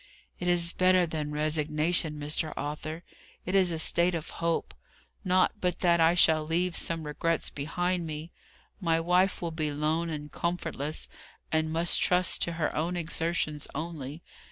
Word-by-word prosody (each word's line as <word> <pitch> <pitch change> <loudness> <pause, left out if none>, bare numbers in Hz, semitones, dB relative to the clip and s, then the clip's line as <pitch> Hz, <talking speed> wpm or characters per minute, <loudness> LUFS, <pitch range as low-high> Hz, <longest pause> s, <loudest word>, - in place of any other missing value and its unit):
"It 180 - -3
is 175 -1 +3
better 185 -1 +4
than 155 -2 -4
resignation, 150 +2 0
Mr. 150 +1 -2
Arthur, 155 +3 -4 0.4
it 185 - -3
is 190 -3 +4
a 165 - -2
state 170 +2 +3
of 160 - -5
hope. 165 0 -1 0.5
Not 185 +2 +2
but 180 -2 -1
that 170 -2 +4
I 165 +1 +5
shall 160 -3 +5
leave 170 +3 0
some 165 -1 0
regrets 155 +2 -1
behind 175 +4 -2
me. 155 +2 -6 0.5
My 165 -4 +1
wife 180 +3 +2
will 170 - -2
be 155 -2 -2
lone 155 +3 0
and 150 -2 -6
comfortless, 155 -2 -3 0.4
and 160 0 +1
must 165 +2 +4
trust 180 0 +2
to 170 - 0
her 160 -2 -2
own 170 +3 -1
exertions 160 -2 -2
only. 155 -1 -5
165 Hz, 155 wpm, -29 LUFS, 155-175 Hz, 0.5 s, I